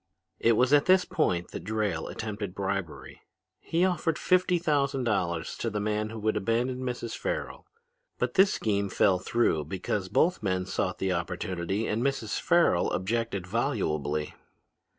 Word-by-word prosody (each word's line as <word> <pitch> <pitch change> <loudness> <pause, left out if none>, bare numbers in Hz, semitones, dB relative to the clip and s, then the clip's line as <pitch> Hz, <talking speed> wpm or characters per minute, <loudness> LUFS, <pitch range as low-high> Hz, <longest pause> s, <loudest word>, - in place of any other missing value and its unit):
"It 115 - +4
was 125 +5 +3
at 145 -1 +5
this 185 0 +5
point 90 - 0
that - - -6
Drayle 105 -5 -1
attempted 105 -3 -5
bribery. 95 -4 -4 0.4
He 170 +3 +1
offered 170 -3 0
fifty 180 -1 +3
thousand 140 -5 +1
dollars 90 -7 -1
to 115 - -2
the 105 -1 -3
man 105 +1 -1
who 115 - -7
would 110 +1 +1
abandon 120 +5 0
Mrs. 125 -2 -4
Farrel. - - -4 0.5
But - - -1
this 190 0 +5
scheme 100 -2 0
fell 95 -1 +3
through 90 -8 +1
because 95 +3 -3
both 180 - +2
men 95 -2 -1
sought 95 0 -2
the 95 -1 0
opportunity 90 +3 -2
and 110 +2 -1
Mrs. 130 -6 -1
Farrel - - +3
objected 100 0 -1
volubly. 75 - -1
110 Hz, 150 wpm, -28 LUFS, 95-130 Hz, 0.5 s, at